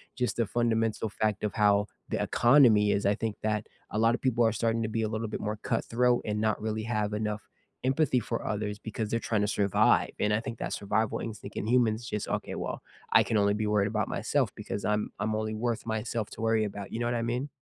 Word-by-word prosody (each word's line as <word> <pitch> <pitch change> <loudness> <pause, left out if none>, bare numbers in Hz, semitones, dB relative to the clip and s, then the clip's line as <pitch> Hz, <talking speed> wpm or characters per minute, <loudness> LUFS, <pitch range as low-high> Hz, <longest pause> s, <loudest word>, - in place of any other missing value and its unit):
just 125 -1 -1
the 115 - +2
fundamental 115 -2 0
fact 105 0 -1
of 105 - -1
how 105 -1 +4 0.2
the - - -1
economy 120 -5 +5
is, 100 - 0
I 100 - +4
think 110 -2 -3
that 105 -1 -1 0.2
a - - -2
lot 115 +1 +4
of - - -8
people 120 -2 +2
are 110 - +4
starting 115 +1 0
to 110 - -2
be 115 +1 -1
a - - +1
little 110 0 -2
bit - - -4
more 105 0 -2
cutthroat 125 +1 +1
and 105 0 -1
not 110 -1 +1
really 110 0 -2
have 105 -2 -1
enough 105 0 -2 0.4
empathy 130 0 +2
for 115 +1 -4
others 105 -1 -2
because 110 -1 -4
they're 115 - 0
tryna 105 -3 0
survive. 100 -2 +3
And 105 0 +2
I 105 - +2
think 115 0 -6
that - - -3
survival 105 +2 0
instinct 105 -2 -7
in 105 - -2
humans 115 -2 +3
is 120 - -9
just, 105 - -3
"Okay, - - -3
well, - - -4 0.3
I - - +7
can 110 - 0
only 100 0 +3
be 105 0 -1
worried 105 -1 +2
about 110 -1 -1
myself - - 0
because 100 - -5
I'm 105 0 0
I'm 110 0 0
only 110 0 -2
worth 115 0 -2
myself 110 -1 -2
to 110 - -8
worry 110 -1 +2
about." 100 -1 -6
You 115 - -3
know 120 - 0
what 120 - 0
I 115 - 0
mean? 125 +5 -2
110 Hz, 240 wpm, -29 LUFS, 105-115 Hz, 0.4 s, I